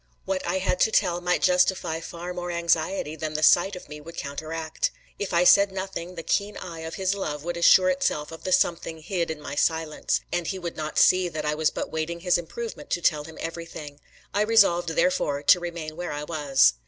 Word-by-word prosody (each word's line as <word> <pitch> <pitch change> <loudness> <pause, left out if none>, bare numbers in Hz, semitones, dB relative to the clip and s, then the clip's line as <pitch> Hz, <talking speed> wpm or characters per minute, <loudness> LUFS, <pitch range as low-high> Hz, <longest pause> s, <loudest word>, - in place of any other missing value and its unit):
What 190 -1 -2
I 175 +2 0
had 185 -1 0
to 220 - +3
tell 175 -3 +2
might 180 0 0
justify 180 -2 +2
far 170 +2 -7
more 175 0 -5
anxiety 170 -1 0
than 155 0 -4
the 155 - -1
sight 175 +5 +5
of 180 - -10
me 150 0 -9
would 165 +3 -11
counteract. 155 +3 -3 0.3
If 200 - -3
I 170 0 +3
said 200 +2 +6
nothing, 190 -2 -5
the 165 - -6
keen 200 +5 -1
eye 170 -3 -7
of 160 0 -6
his 190 0 0
love 150 -7 -4
would 175 +1 -3
assure 185 +2 +6
itself 170 -5 -1
of 165 - -10
the 185 - -3
something 165 -3 +1
hid 175 -1 -2
in 160 -1 -4
my 145 -1 -7
silence, 160 +1 0
and 175 -2 -1
he 190 - -2
would 175 -2 -5
not 155 -1 -5
see 185 -1 +5
that 155 -2 -5
I 150 - +1
was 155 0 +1
but - - -5
waiting 165 +2 -3
his 180 -1 +2
improvement 230 +7 -7
to 175 - -1
tell 150 -2 +2
him 160 0 -11
everything. 165 -3 -7 0.3
I 205 - +1
resolved 200 -6 +4
therefore 160 - +1
to 180 - +6
remain 170 -3 -6
where 175 - -4
I 145 0 -4
was. 145 - +3
170 Hz, 215 wpm, -25 LUFS, 155-180 Hz, 0.3 s, said